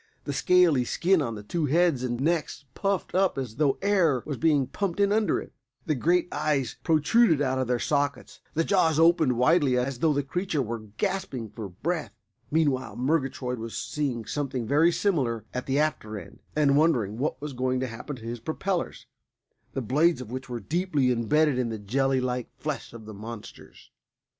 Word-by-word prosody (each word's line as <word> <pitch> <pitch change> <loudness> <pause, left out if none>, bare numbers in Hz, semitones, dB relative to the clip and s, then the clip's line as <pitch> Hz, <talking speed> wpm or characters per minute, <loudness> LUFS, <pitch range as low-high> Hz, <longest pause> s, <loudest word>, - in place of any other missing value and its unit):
The - - -4
scaly 175 -8 +4
skin 175 +7 +2
on 115 -5 -2
the 105 - -8
two 155 +8 -1
heads 160 -3 +2
and 120 -1 -2
necks 155 0 -1
puffed 195 -2 -1
up 190 -3 +2
as 125 -4 -4
though 140 -3 +2
air 175 -10 +3
was 150 - -3
being 150 -3 +3
pumped 195 +5 -3
in 200 0 +3
under 215 0 +2
it. - - -10 0.3
The 155 - +1
great 170 +6 +2
eyes 140 -4 0
protruded 160 +3 +4
out 130 -2 0
of 130 - -1
their 125 0 +1
sockets; 145 +2 -1 0.2
the 165 - +2
jaws 165 -5 +2
opened 165 -6 +4
widely 140 -1 +3
as 125 0 -1
though 160 +2 +3
the 145 -1 0
creature 160 0 -1
were 115 -1 -5
gasping 185 - -2
for 105 -3 -7
breath. 150 - -3 0.3
Meanwhile 145 -4 0
Murgatroyd 130 -2 -1
was 115 -1 -6
seeing 130 -7 -2
something 130 -2 -3
very 150 +8 +4
similar 135 - 0
at 125 - -4
the 135 +1 +1
after 145 -8 -1
end, - - -11 0.2
and 145 -2 +3
wondering 120 -9 +2
what 150 +4 -1
was 150 -1 -6
going 130 0 0
to 130 - -1
happen 120 +5 -7
to 115 -3 -12
his 120 +1 -4
propellers, 175 - -3 0.7
the 135 - -2
blades 155 +8 +3
of 125 -3 -8
which 130 +1 -6
were 120 -1 -4
deeply 150 - 0
imbedded 130 +4 +2
in 120 -2 0
the 110 - -4
jelly 130 +6 +1
like 125 -1 -2
flesh 150 -2 -4
of 115 -2 -11
the 110 - -8
monsters. 110 +2 -10
140 Hz, 185 wpm, -27 LUFS, 125-165 Hz, 0.7 s, scaly